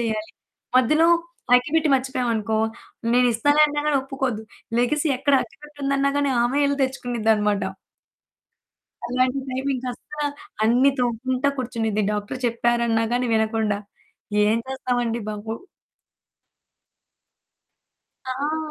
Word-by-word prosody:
చేయాలి. 220 -2 -2 0.5
మధ్యలో 305 +6 +4 0.5
అగ్గిపెట్టి 300 +6 +3
మర్చిపోయామనుకో 240 -5 0 0.6
నేనిస్తాలే 250 +5 +4
అన్న 295 0 -3
గానీ 300 -2 +3
ఒప్పుకోదు. 265 -4 -3 0.4
లెగిసి 295 +6 +1
ఎక్కడ 285 +1 +2
అగ్గిపెట్టి 295 +1 -17
ఉందన్నా 275 0 +2
గానీ 285 -1 +1
ఆమె 250 +4 +1
ఎళ్లి 280 0 0
తెచ్చుకునిద్ది 245 -4 -1
అన్నమాట. 210 -1 0 1.4
అలాంటి 255 +2 +1
టైమింగ్ 260 0 -2
అస్సలా 295 +4 -5 0.4
అన్ని 245 +5 +5
తొముకుంట 250 +2 -1
కూర్చునిది, 225 -4 -1
డాక్టర్ 210 +4 -4
చెప్పారన్న 235 -1 +1
గానీ 245 +1 +1
వినకుండా. 220 -2 +1 0.7
ఏం 220 +2 +3
చేస్తాం 255 -2 -1
అండి 230 0 -2
బాబు! 210 +1 -5 2.7
ఆ! 285 +4 -2
250 Hz, 105 wpm, -23 LUFS, 225-275 Hz, 2.7 s, అన్ని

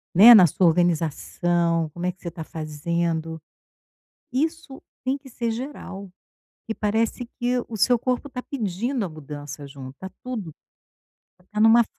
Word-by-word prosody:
Né, 220 +7 +11
na 200 -6 +9
sua 175 +3 +3
organização, 170 0 +1
como 175 +1 -4
é 180 - +1
que 180 - -27
você - - -7
está 170 -1 -5
fazendo, 160 +1 -2 0.9
isso 310 +1 -2 0.2
tem 265 +2 0
que 275 -1 -14
ser 235 -1 -2
geral, 225 -6 -6 0.6
e - - 0
parece 225 +3 0
que 245 0 +1
o 230 - -6
seu 240 +3 +3
corpo 255 +3 -1
está 250 -1 -5
pedindo 235 0 -2
a 185 - -3
mudança 145 -1 -8
junto, 135 -1 -9
tá 190 - -6
tudo, 215 - -5 0.8
tá 180 - -27
tendo 215 +1 +5
uma 235 +1 +7
190 Hz, 155 wpm, -24 LUFS, 165-240 Hz, 0.9 s, Né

